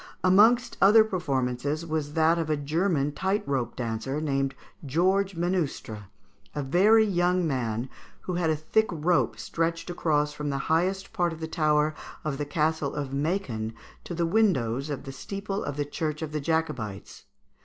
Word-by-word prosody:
"Amongst 215 Hz, +7 st, +5 dB
other 215 Hz, +3 st, +8 dB
performances 145 Hz, -, -2 dB
was 155 Hz, -2 st, -3 dB
that 165 Hz, +1 st, +3 dB
of 160 Hz, -2 st, -2 dB
a 155 Hz, -, +1 dB
German 150 Hz, 0 st, 0 dB
tight 195 Hz, +7 st, -1 dB
rope 130 Hz, -4 st, -1 dB
dancer, 120 Hz, +4 st, -3 dB
named 135 Hz, -3 st, -1 dB, 0.3 s
Georges 185 Hz, +6 st, +1 dB
Menustre, 165 Hz, -, -2 dB, 0.5 s
a 145 Hz, -, -2 dB
very 205 Hz, +10 st, +5 dB
young 180 Hz, -2 st, +1 dB
man, 120 Hz, -5 st, -1 dB, 0.3 s
who 180 Hz, -, -4 dB
had 175 Hz, -2 st, +1 dB
a 155 Hz, -, +2 dB
thick 220 Hz, +8 st, +1 dB
rope 170 Hz, +2 st, +1 dB
stretched 165 Hz, +1 st, -2 dB
across 150 Hz, -4 st, +1 dB
from 150 Hz, -1 st, -4 dB
the 140 Hz, -, -1 dB, 0.2 s
highest 190 Hz, +5 st, 0 dB
part 175 Hz, -5 st, +1 dB
of 160 Hz, -, -10 dB
the 160 Hz, -, -4 dB
tower 155 Hz, -2 st, +2 dB, 0.3 s
of 150 Hz, -2 st, -3 dB
the 145 Hz, -, -1 dB
Castle 155 Hz, -1 st, 0 dB
of 145 Hz, -2 st, -3 dB
Mâcon 140 Hz, -, -2 dB, 0.3 s
to 175 Hz, -, -6 dB
the 170 Hz, 0 st, +1 dB
windows 150 Hz, -, +1 dB
of 145 Hz, -, -4 dB
the 135 Hz, -, -7 dB
steeple 195 Hz, +7 st, -5 dB
of 145 Hz, -, -4 dB
the 145 Hz, -, 0 dB
Church 155 Hz, +1 st, -3 dB
of 155 Hz, -, -5 dB
the 150 Hz, -1 st, -2 dB
Jacobites. 150 Hz, -11 st, -3 dB
155 Hz, 165 wpm, -27 LUFS, 140-180 Hz, 0.5 s, other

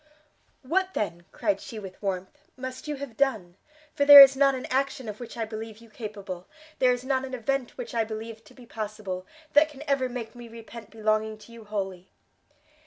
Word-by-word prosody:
"What, 375 Hz, +7 st, 0 dB
then," 175 Hz, -3 st, -3 dB
cried 200 Hz, -4 st, -1 dB
she 225 Hz, -, -8 dB
with 190 Hz, -3 st, -9 dB
warmth, 195 Hz, +8 st, -4 dB
"must 260 Hz, +2 st, -7 dB
you 300 Hz, -, -2 dB
have 275 Hz, -4 st, -8 dB
done? 220 Hz, -10 st, 0 dB, 0.4 s
for 285 Hz, -, +1 dB
there 285 Hz, 0 st, +12 dB
is 275 Hz, -1 st, +11 dB
not 275 Hz, 0 st, +4 dB
an 255 Hz, -, -5 dB
action 265 Hz, -2 st, 0 dB
of 210 Hz, 0 st, -6 dB
which 240 Hz, -1 st, -9 dB
I 225 Hz, -, -1 dB
believe 220 Hz, 0 st, -7 dB
you 230 Hz, -1 st, -17 dB
capable, 200 Hz, -5 st, -7 dB, 0.3 s
there 255 Hz, -1 st, +5 dB
is 245 Hz, 0 st, -2 dB
not 260 Hz, 0 st, 0 dB
an 260 Hz, -1 st, -5 dB
event 255 Hz, +1 st, -2 dB
which -, -, -6 dB
I 230 Hz, -, +2 dB
believe 220 Hz, +1 st, -7 dB
to -, -, -18 dB
be 250 Hz, -, -14 dB
possible, 210 Hz, -5 st, -5 dB, 0.3 s
that 300 Hz, +2 st, +6 dB
can 290 Hz, -3 st, -10 dB
ever 270 Hz, -2 st, +1 dB
make 240 Hz, -3 st, -6 dB
me 240 Hz, -1 st, -10 dB
repent 230 Hz, -1 st, -11 dB
belonging 215 Hz, -1 st, 0 dB
to 215 Hz, +2 st, -16 dB
you 230 Hz, -2 st, -12 dB
wholly!" 190 Hz, -3 st, -4 dB
230 Hz, 200 wpm, -27 LUFS, 215-265 Hz, 0.4 s, there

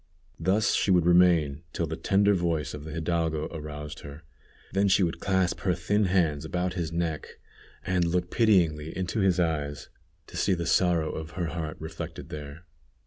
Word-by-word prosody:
Thus 95 Hz, +6 st, +2 dB
she -, -, +1 dB
would 90 Hz, -3 st, +4 dB
remain 85 Hz, -5 st, +4 dB
till 85 Hz, -, -1 dB
the 80 Hz, 0 st, -4 dB
tender 100 Hz, +4 st, +3 dB
voice 85 Hz, -5 st, -1 dB
of 75 Hz, 0 st, -7 dB
the 80 Hz, -, -7 dB
hidalgo 80 Hz, -1 st, -1 dB
aroused 75 Hz, -1 st, -7 dB
her; 70 Hz, +3 st, -10 dB, 0.5 s
then 100 Hz, +1 st, +3 dB
she 95 Hz, 0 st, +4 dB
would 85 Hz, -1 st, -1 dB
clasp 95 Hz, -1 st, +1 dB
her 90 Hz, -2 st, +1 dB
thin 105 Hz, +4 st, +1 dB
hands 85 Hz, -6 st, +1 dB
about 90 Hz, +3 st, -2 dB
his 85 Hz, -4 st, -3 dB
neck, 85 Hz, -2 st, -3 dB, 0.5 s
and 90 Hz, -1 st, +1 dB
look 90 Hz, +1 st, -1 dB
pityingly 85 Hz, -9 st, +2 dB
into 95 Hz, +4 st, -2 dB
his 95 Hz, -3 st, +3 dB
eyes 75 Hz, -4 st, -1 dB, 0.4 s
to -, -, -10 dB
see 95 Hz, -, +2 dB
the 85 Hz, -1 st, -3 dB
sorrow 85 Hz, -2 st, +2 dB
of 80 Hz, +1 st, -7 dB
her 85 Hz, -3 st, -1 dB
heart 80 Hz, -1 st, -4 dB
reflected 80 Hz, +1 st, -7 dB
there. 75 Hz, +3 st, -8 dB
85 Hz, 175 wpm, -27 LUFS, 80-90 Hz, 0.5 s, would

